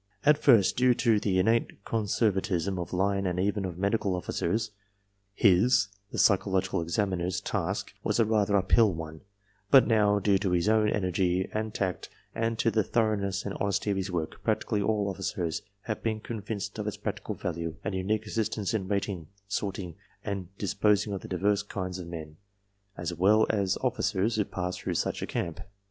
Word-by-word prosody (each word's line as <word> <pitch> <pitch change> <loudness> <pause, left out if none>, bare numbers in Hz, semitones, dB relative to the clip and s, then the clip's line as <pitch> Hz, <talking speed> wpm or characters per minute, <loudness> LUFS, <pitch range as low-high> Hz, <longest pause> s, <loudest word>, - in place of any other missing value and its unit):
"... 100 - -40
At 150 0 +5
first, 115 -11 +5
due 125 0 +4
to 115 -4 +3
the 100 -3 0
innate 110 +1 +1
conservatism 100 -4 0
of 85 - -5
line 100 +1 +1
and 90 0 -1
even 100 +1 0
of 90 -2 -5
medical 100 0 0
officers, 105 +4 -2 0.6
his 100 +2 +4 0.2
(the - - -5
psychological 95 -3 +2
examiner's) 90 0 -1
task - - -3
was - - 0
a 115 - +5
rather 105 -2 +2
uphill 100 +3 +4
one, 80 -1 -7 0.5
but 135 +3 +8
now, 105 -3 +3
due 100 -1 +2
to 95 -2 0
his 85 +2 +1
own 110 -1 +4
energy 95 -2 0
and 110 0 -2
tact 95 -4 -3 0.2
and 115 0 -1
to 115 - +2
the 110 -1 +2
thor 110 +1 +1
oughness 100 -1 -3
and 100 - -3
honesty 100 +1 0
of 100 - 0
his 95 0 -2
work, 80 -3 -4
practically 105 - 0
all 105 0 +1
officers 90 -3 -2 0.2
have 110 0 -4
been 110 -1 -1
convinced 105 -2 -5
of - - -3
its - - -3
practical - - -4
value 85 -2 -4
and 105 - -2
unique 105 +4 -1
assistance 110 -2 -2
in 100 -4 -1
rating, 100 -4 -2 0.2
sorting 100 -3 -3
^ - - -25 0.3
and 95 -3 -3
disposing 105 +1 +1
of 95 - -4
the - - -9
divers 100 +2 +1
kinds 95 -3 -5
of 85 - -7
men 80 -2 -8 0.6
as 85 0 -3
well 105 +6 +4
as 100 -3 0
officers 110 -4 +1
who 105 - +3
pass 90 0 -3
through - - -3
such - - -1
a - - -3
camp. 85 -2 -3
100 Hz, 185 wpm, -28 LUFS, 90-110 Hz, 0.6 s, but